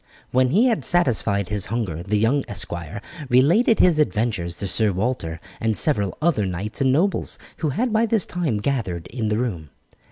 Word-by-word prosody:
When 130 0 +3
he 205 - +4
had 235 -4 +1
satisfied 110 - +1
his 105 -2 -1
hunger 100 -8 -3
the 100 +4 0
young 120 +7 +2
esquire 95 0 -5 0.3
related 170 - +4
his 175 -4 +4
adventures 105 - 0
to - - -3
Sir 105 +3 +1
Walter 95 -5 -2 0.2
and 110 -1 0
several 100 - 0
other 150 - +1
knights 95 +7 -3
and 130 -1 +3
nobles, 180 +9 +1 0.2
who 155 - -1
had 225 - -1
by 225 +1 +3
this 220 -4 +2
time 165 -11 -1
gathered 105 -11 -2
in 115 0 -3
the 105 - 0
room. 95 - -3
115 Hz, 180 wpm, -22 LUFS, 100-150 Hz, 0.3 s, he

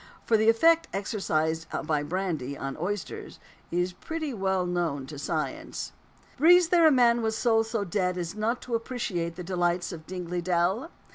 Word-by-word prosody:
For 230 - +3
the 220 +1 +4
effect 325 +8 +4
exercised 165 -5 -1 0.2
by 150 -2 0
brandy 155 -4 -3
on 135 0 -4
oysters 205 +1 -4 0.3
is 175 +1 0
pretty 315 - -4
well 190 -3 0
known 170 -6 -1
to 145 +1 -8
science. 155 +1 -3 0.5
Breathes 345 +3 +6
there 340 -2 +6
a - - +6
man 240 -3 +4
with 220 -1 0
soul 225 -1 +3
so 225 -1 -2
dead 180 -1 -1
as 175 0 -3
not 220 +4 -1
to 245 - -6
appreciate 210 -8 -2
the 180 - -6
delights 175 0 0
of 160 -3 -9
Dingley 180 -1 -4
Dell? 185 - 0
185 Hz, 165 wpm, -27 LUFS, 170-230 Hz, 0.5 s, Breathes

